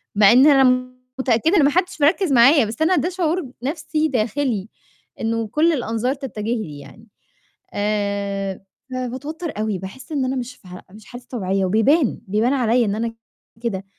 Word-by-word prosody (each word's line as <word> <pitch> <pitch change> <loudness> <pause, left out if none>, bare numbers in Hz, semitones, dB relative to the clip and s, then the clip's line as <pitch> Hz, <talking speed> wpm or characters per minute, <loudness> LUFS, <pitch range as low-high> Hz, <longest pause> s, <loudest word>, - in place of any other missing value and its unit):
مع 205 0 +6
إن 260 +4 +7
أنا 255 -3 +4 0.3
متأكدة 260 - +2
إن 305 - +5
ما 280 - +5
حدش 360 -1 -1
مركِّز 335 +2 +3
معايا، 260 +2 +6
بس 225 +8 -7
أنا 365 +3 +3
ده 335 +5 0
شعور 360 -1 -1
ب 260 -6 -10
نَفْسي 310 +2 -1
داخِلي 230 -3 -1 0.5
إنه 230 0 -1
كل 320 +9 +2
الأنظار 240 -1 -1
تَتَجه 265 -6 -7 0.2
لي 145 -5 -9
يعني، 220 +10 -15 0.7
آآ 200 -2 -2 0.3
فباتوتّر 280 +6 -5
أوي 215 -3 -1
باحس 260 - -10
إن 275 -3 0
أنا 260 +1 -2
مش 250 0 -5
في 185 - -20
ح 180 0 -9
مش 210 +1 -14
حالتي 245 0 -11
طبيعية 195 -5 -1
وبيبان، 235 - +2
بيبان 220 +6 +1
عليّا 245 -2 +2
إن 205 0 -1
أنا 230 +1 -3 0.5
كده. 195 -5 -3
245 Hz, 170 wpm, -21 LUFS, 215-285 Hz, 0.7 s, إن